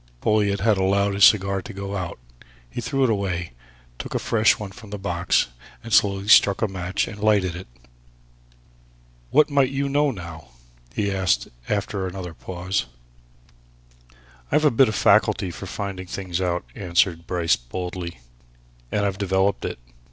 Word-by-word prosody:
Folliot 100 Hz, -, +1 dB
had 105 Hz, -2 st, +3 dB
allowed 100 Hz, +1 st, +2 dB
his 100 Hz, +1 st, +6 dB
cigar 100 Hz, -2 st, +4 dB
to 115 Hz, +1 st, -9 dB
go 100 Hz, 0 st, -5 dB
out. 90 Hz, -3 st, -4 dB, 0.5 s
He 90 Hz, -, -6 dB
threw 135 Hz, +4 st, 0 dB
it 130 Hz, -, +3 dB
away, 90 Hz, -, -2 dB, 0.5 s
took -, -, -6 dB
a -, -, +3 dB
fresh 110 Hz, -1 st, +3 dB
one 105 Hz, -2 st, -7 dB
from 110 Hz, +1 st, -13 dB
the 105 Hz, -, -5 dB
box, 90 Hz, -8 st, 0 dB, 0.3 s
and 115 Hz, -, -6 dB
slowly 100 Hz, -1 st, +3 dB
struck 100 Hz, -1 st, +6 dB
a -, -, +3 dB
match 95 Hz, -2 st, -2 dB
and 100 Hz, -, -8 dB
lighted 100 Hz, -4 st, +2 dB
it. 90 Hz, -, -8 dB, 1.6 s
"What 150 Hz, 0 st, +4 dB
might 140 Hz, -2 st, +3 dB
you 140 Hz, +1 st, -1 dB
know, 145 Hz, +1 st, +2 dB
now?" 85 Hz, -, -8 dB, 0.4 s
he 100 Hz, -2 st, -1 dB
asked 95 Hz, -11 st, 0 dB, 0.2 s
after 100 Hz, -2 st, -1 dB
another 90 Hz, -2 st, -6 dB
pause. 95 Hz, +3 st, -3 dB, 1.6 s
"I've 155 Hz, -, +3 dB
a 150 Hz, -, +5 dB
bit 125 Hz, +1 st, +4 dB
of 110 Hz, -, -3 dB
a -, -, -1 dB
faculty 90 Hz, -, +3 dB
for 95 Hz, -, -8 dB
finding 95 Hz, -1 st, -5 dB
things 95 Hz, -1 st, -4 dB
out," 90 Hz, -4 st, -1 dB
answered 85 Hz, -2 st, 0 dB
Bryce 85 Hz, -3 st, +2 dB
boldly. 85 Hz, +3 st, -6 dB, 0.7 s
"And 105 Hz, -1 st, +1 dB
I've 95 Hz, -1 st, -2 dB
developed 95 Hz, 0 st, +1 dB
it. -, -, -4 dB
100 Hz, 160 wpm, -23 LUFS, 90-105 Hz, 1.6 s, his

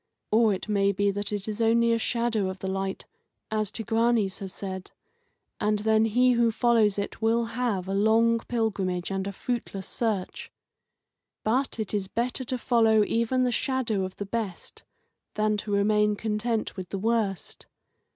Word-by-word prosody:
Or 220 Hz, 0 st, +4 dB
it 190 Hz, -, -3 dB
may 200 Hz, -1 st, +2 dB
be 200 Hz, +1 st, +1 dB
that 205 Hz, +1 st, -3 dB
it 205 Hz, -1 st, -2 dB
is 215 Hz, +1 st, -3 dB
only 230 Hz, +1 st, +4 dB
a 230 Hz, -, +1 dB
shadow 230 Hz, -4 st, 0 dB
of 190 Hz, -, -5 dB
the 190 Hz, -, -5 dB
light, 195 Hz, 0 st, -3 dB, 0.5 s
as 215 Hz, -2 st, 0 dB
Tigranes 225 Hz, -2 st, +1 dB
has 195 Hz, -2 st, -6 dB
said, 190 Hz, -1 st, -6 dB, 0.7 s
and 210 Hz, 0 st, +1 dB
then 220 Hz, +1 st, +3 dB
he 250 Hz, +3 st, +3 dB
who 235 Hz, -1 st, +3 dB
follows 225 Hz, -3 st, +3 dB
it 200 Hz, +2 st, -4 dB
will 230 Hz, +1 st, +2 dB
have 225 Hz, -7 st, -1 dB
a 195 Hz, -, -2 dB
long 225 Hz, +3 st, +3 dB
pilgrimage 195 Hz, -6 st, -1 dB
and 195 Hz, 0 st, -2 dB
a -, -, -3 dB
fruitless 200 Hz, -3 st, -4 dB
search. 215 Hz, -6 st, -3 dB, 0.9 s
But 255 Hz, +5 st, 0 dB
it 215 Hz, -2 st, -3 dB
is 200 Hz, -2 st, -1 dB
better 245 Hz, +5 st, -2 dB
to 255 Hz, +1 st, -2 dB
follow 225 Hz, -3 st, +3 dB
even 235 Hz, +4 st, +1 dB
the 250 Hz, -, +1 dB
shadow 240 Hz, -6 st, 0 dB
of 185 Hz, 0 st, -5 dB
the 200 Hz, -, -5 dB
best 205 Hz, -3 st, -5 dB, 0.5 s
than 215 Hz, 0 st, +1 dB
to 210 Hz, 0 st, -5 dB
remain 210 Hz, +1 st, +3 dB
content 220 Hz, +1 st, -2 dB
with 185 Hz, -2 st, -7 dB
the 195 Hz, -, -3 dB
worst. 215 Hz, -2 st, -2 dB
215 Hz, 170 wpm, -27 LUFS, 200-230 Hz, 0.9 s, Or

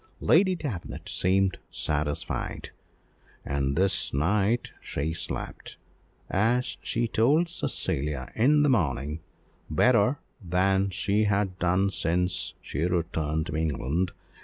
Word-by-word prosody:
Lady 185 Hz, +3 st, +4 dB
Davenant 125 Hz, -, -6 dB
seemed 95 Hz, +1 st, +1 dB
satisfied, 75 Hz, -1 st, -2 dB, 0.7 s
and 70 Hz, -1 st, -1 dB
this 95 Hz, +2 st, +2 dB
night 105 Hz, -, +1 dB
she 75 Hz, +3 st, -3 dB
slept, 80 Hz, -, -6 dB, 0.5 s
as 120 Hz, +6 st, +1 dB
she 120 Hz, 0 st, -1 dB
told 140 Hz, +10 st, +3 dB
Cecilia 70 Hz, -, -2 dB
in 145 Hz, +6 st, +4 dB
the 145 Hz, -, +4 dB
morning, 75 Hz, -, 0 dB, 0.5 s
better 120 Hz, -, +3 dB, 0.3 s
than 95 Hz, +2 st, +2 dB
she 100 Hz, +3 st, +1 dB
had 100 Hz, -2 st, 0 dB
done 95 Hz, +2 st, +2 dB
since 90 Hz, +1 st, 0 dB
she 70 Hz, -, -5 dB
returned 80 Hz, -3 st, -1 dB
to 85 Hz, -, -5 dB
England. 80 Hz, +3 st, 0 dB
95 Hz, 110 wpm, -27 LUFS, 80-110 Hz, 0.7 s, Lady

